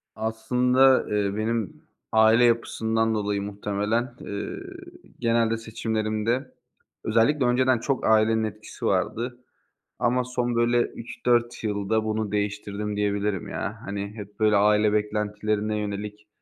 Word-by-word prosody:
Aslında, 125 +4 +3
eee, 100 -1 0
benim 110 -1 -2 0.3
aile 110 +2 +5
yapısından 115 -1 +1
dolayı 105 -1 -1
muhtemelen, 105 +4 -2
eee, 100 0 -5 0.6
genelde 115 -1 +2
seçimlerimde 110 +2 -2 0.5
özellikle 130 +4 +2
önceden 125 0 +3
çok 135 +2 -1
ailenin 110 0 +4
etkisi 110 -3 -6
vardı. 120 +2 -1 0.6
Ama 125 +1 +2
son, 125 -1 -2
böyle, 120 +1 +3
3-4 120 0 -1
yılda 105 +1 0
bunu 110 -1 -2
değiştirdim 105 0 -2
diyebilirim 100 -1 -1
ya. 105 +3 -4
Hani, 100 0 -3
hep, 105 -2 -10
böyle, 110 -1 +4
aile 105 +1 +4
beklentilerine 105 0 -1
yönelik 105 +1 -5
110 Hz, 115 wpm, -25 LUFS, 105-120 Hz, 0.6 s, aile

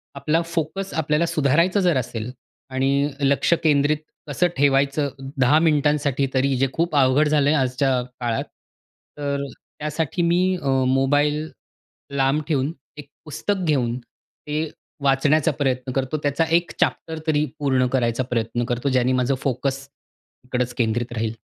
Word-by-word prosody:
आपला 155 +4 +1
फोकस 170 +3 -3
आपल्याला 155 +1 +1
सुधारायचा 165 +6 +2
जर 175 -6 +3
असेल 120 -1 -4 0.4
आणि 135 +2 +1
लक्ष 140 +4 +3
केंद्रित 145 0 +3 0.3
कसं 175 +5 +1
ठेवायचं 140 +1 +2 0.3
10 140 +5 +5
मिनिटांसाठी 150 -3 +2
तरी 135 0 +2
जे 135 +1 +2
खूप 170 -2 -1
अवघड 140 +2 +4
झालं 145 -1 +3
आहे 155 - +3
आजच्या 130 0 +1 0.2
काळात. 120 -2 -1 0.7
तर 140 -1 -2 0.4
त्यासाठी 155 +2 -2
मी 170 +1 +3 0.2
अ, 140 - -4 0.2
मोबाईल 145 +3 +1 0.7
लांब 135 +3 +2
ठेवून 145 0 0 0.3
एक 145 -1 -9 0.2
पुस्तक 185 +5 -2
घेऊन 125 -6 +1
ते 150 +5 -7 0.3
वाचण्याचा 140 +3 +3
प्रयत्न 130 -3 -1
करतो. 135 +3 -1
त्याचा 145 +3 +1
एक 170 0 -1
चॅप्टर 160 -1 0
तरी 150 -1 +2
पूर्ण 130 -3 +2
करायचा 120 -1 +1
प्रयत्न 120 0 -1
करतो. 120 +2 -2
ज्याने 130 -1 +2
माझं 130 +1 +1
फोकस 135 +1 -2 0.6
इकडच 125 -1 -2
केंद्रित 120 +1 -1
राहील. 110 -1 -2
140 Hz, 135 wpm, -22 LUFS, 130-155 Hz, 0.7 s, 10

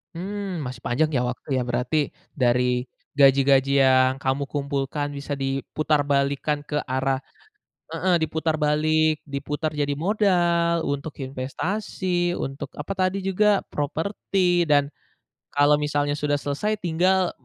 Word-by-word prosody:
Mmm, 195 0 -4
masih 125 -1 -8
panjang 155 +6 +1
ya 125 - +2
waktu 125 0 -5
ya - - +1
berarti 125 +4 -1 0.4
dari, 125 -1 +2 0.4
gaji-gaji 135 0 +5
yang 130 0 +5
kamu 135 +1 0
kumpulkan 140 0 -2
bisa 145 0 -5
diputarbalikkan 140 +1 0
ke 150 - -4
arah 130 0 0 0.7
heeh, 185 -2 +2
diputar 160 0 -1
balik 155 +1 +2
diputar 145 +2 -3
jadi 145 -1 0
modal 170 -1 +2
untuk 145 +2 -3
investasi 175 +7 -2
untuk 135 +1 -6
apa - - -4
tadi 185 0 +1
juga? 205 +1 +3
Properti 175 +4 0
dan, 145 -1 +4 0.7
kalau 145 +1 +5
misalnya 145 -1 0
sudah 145 -1 0
selesai 145 +11 -1
tinggal 180 +2 +2
145 Hz, 120 wpm, -24 LUFS, 135-175 Hz, 0.7 s, gaji-gaji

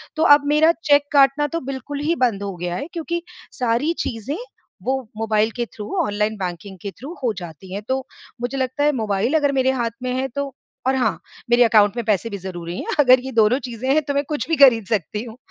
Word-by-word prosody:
तो 315 - +1
अब 290 0 -3
मेरा 305 +3 +5
चेक 285 -1 +5
काटना 280 +1 +4
तो - - +1
बिल्कुल 280 +2 -5
ही 320 +3 0
बंद 200 -4 -2
हो 195 -2 -4
गया 175 0 -3
है 280 - -4
क्योंकि 340 +1 -3 0.4
सारी 250 +7 +1
चीज़ें 230 +6 -3 0.5
वो 260 - +1 0.2
मोबाइल 220 0 +1
के 240 -1 -1
थ्रू, 210 - -7 0.2
ऑनलाइन 210 +1 -1
बैंकिंग 185 +1 -5
के 200 - -4
थ्रू 280 - -9
हो 235 - +2
जाती 175 +2 -9
हैं। 200 - -3
तो 260 +1 +1 0.4
मुझे 245 +3 -2
लगता 260 +2 -1
है, 295 - +4
मोबाइल 220 +1 0
अगर 290 -2 +3
मेरे 260 0 +3
हाथ 235 -3 -1
में 255 - -1
है 260 +1 -1
तो 280 -1 -3 0.3
और 265 - +3
हाँ, 220 -10 0 0.3
मेरे 240 +1 +6
अकाउंट 215 -2 +4
में 235 - -1
पैसे 215 +1 +1
भी 200 - -5
ज़रूरी 175 -2 -6
हैं। - - -3
अगर 255 -2 +7
ये 265 - -4
दोनों 225 +3 +3
चीज़ें 235 +2 -5
हैं, 310 - +3
तो 285 0 -2
मैं 280 +1 +1
कुछ 295 -5 -2
भी 325 - +3
खरीद 230 -5 +3
सकती 210 +1 -2
हूँ, 230 0 -10
240 Hz, 225 wpm, -21 LUFS, 210-280 Hz, 0.5 s, अगर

